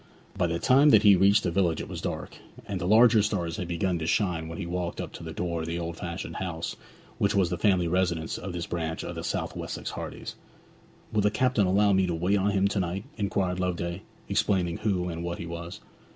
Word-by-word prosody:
By 90 - +1
the 85 0 -1
time 135 - +5
that 110 -6 +6
he 100 -2 +8
reached 100 +3 +4
the - - 0
village 85 -3 +1
it - - -5
was - - -6
dark, - - -5 0.3
and 100 -3 -3
the 85 - -1
larger 110 +1 +6
stars 90 -6 -1
had 90 - -4
begun 85 +1 -1
to 80 - -3
shine 90 -6 0
when 80 +1 -7
he - - -4
walked 85 0 -3
up - - -5
to - - -9
the 80 - -6
door 85 0 -2
of 80 - -4
the 85 +1 -2
old 85 -1 -4
fashioned 85 +1 -5
house 85 -3 -4 0.4
which 100 - +2
was 95 -3 +2
the - - +1
family 95 -4 +3
residence 85 -2 0
of 95 - -5
this 85 0 -4
branch 80 -2 -3
of - - -5
the - - -6
South - - -2
Wessex - - -5
Hardys. - - -6 0.8
'Will 105 - +3
the 105 - +3
captain 120 -3 +2
allow 100 +2 +4
me 95 -1 +3
to 85 - -1
wait 95 +5 +1
on 100 +2 +2
him 100 -1 +2
to 100 - -1
night?' 90 +2 -2
inquired 95 -3 -1
Loveday, 85 0 -2 0.3
explaining 90 -4 +1
who 95 -5 0
and 85 -1 -4
what 85 0 -3
he - - -6
was. 85 0 -7
90 Hz, 235 wpm, -27 LUFS, 85-100 Hz, 0.8 s, he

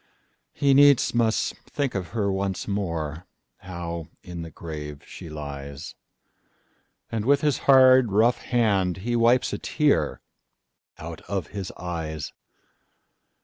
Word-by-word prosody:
He 140 -1 +2
needs 140 -1 +5
must 115 -2 +1
think 140 -3 -2
of 95 -3 -3
her 100 -4 -1
once 95 0 -2
more, 85 -5 -3 0.3
How 85 -3 -6 0.2
in 90 -1 -7
the 85 - -7
grave 75 -2 -8
she 85 - -10
lies; 70 -2 -7 1.2
And 110 -2 -2
with 140 +4 +3
his 150 -2 +1
hard, 130 -3 +7
rough 115 +4 +3
hand 100 -7 +1
he 120 0 0
wipesA 120 +2 +3
tear 140 - +1 0.8
out 80 +1 -8
of 95 -6 -2
his 100 -3 -5
eyes. 80 -4 -5
95 Hz, 120 wpm, -25 LUFS, 80-120 Hz, 1.2 s, hard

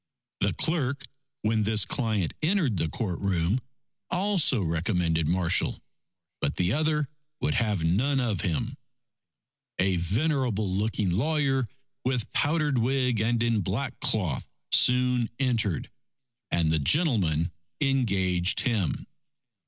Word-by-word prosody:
The - - +1
clerk, 140 -4 +1 0.4
when 110 0 +2
this 105 0 +1
client 110 - 0
entered 160 - +1
the 80 - 0
courtroom, 95 +1 -1 0.5
also 180 - +2
recommended 85 -1 0
Marshall, 90 0 +1 0.6
but - - -1
the 90 +3 +1
other 150 0 +1 0.3
would - - 0
have 105 -7 +1
none 125 +12 +2
of 115 -6 -1
him. 110 - -2 1.0
A 95 -1 +2
venerable 110 - 0
looking 100 0 0
lawyer, 135 - +1 0.4
with 125 -3 -2
powdered 150 -3 +2
wig 125 -2 +1
and 115 +1 +1
in 115 -3 +1
black 115 +9 -3
cloth, 90 -11 0 0.2
soon 125 -1 +4
entered, 115 - 0 0.6
and 80 -2 +1
the 80 - +2
gentleman 85 - +2 0.3
engaged 95 -10 +1
him. 110 - -1
110 Hz, 115 wpm, -27 LUFS, 90-135 Hz, 1.0 s, soon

